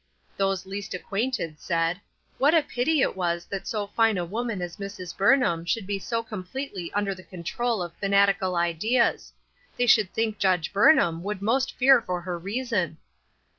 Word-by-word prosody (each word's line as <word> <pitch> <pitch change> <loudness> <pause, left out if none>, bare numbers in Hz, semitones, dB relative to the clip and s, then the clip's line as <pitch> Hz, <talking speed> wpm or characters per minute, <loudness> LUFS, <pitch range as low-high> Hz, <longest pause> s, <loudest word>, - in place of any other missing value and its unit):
Those 195 -1 0
least 200 0 -5
acquainted 195 -5 -3
said: 170 +1 -1 0.2
" - - -39
What 290 +5 +4
a 320 - +4
pity 285 +2 0
it - - 0
was 170 -2 -1
that 195 -1 -6
so 210 -2 -2
fine 225 0 +2
a 175 - -1
woman 225 +3 -3
as 175 +1 -5
Mrs. 195 -3 -7
Burnham 200 -6 +3
should 195 +4 -1
be 200 0 -2
so 230 +3 -2
completely 205 -2 -6
under 205 -1 0
the 185 - -12
control 195 +5 -3
of 170 -1 -7
fanatical 200 -2 +2
ideas; 175 +9 +1 0.5
they 245 - +2
should 215 -5 +4
think 220 -2 -1
Judge 185 -3 +1
Burnham 200 - +4
would 205 +2 -3
almost 255 +6 0
fear 265 -1 +6
for 180 -4 -3
her 175 -1 -4
reason 200 - -2
200 Hz, 170 wpm, -26 LUFS, 180-230 Hz, 0.5 s, fear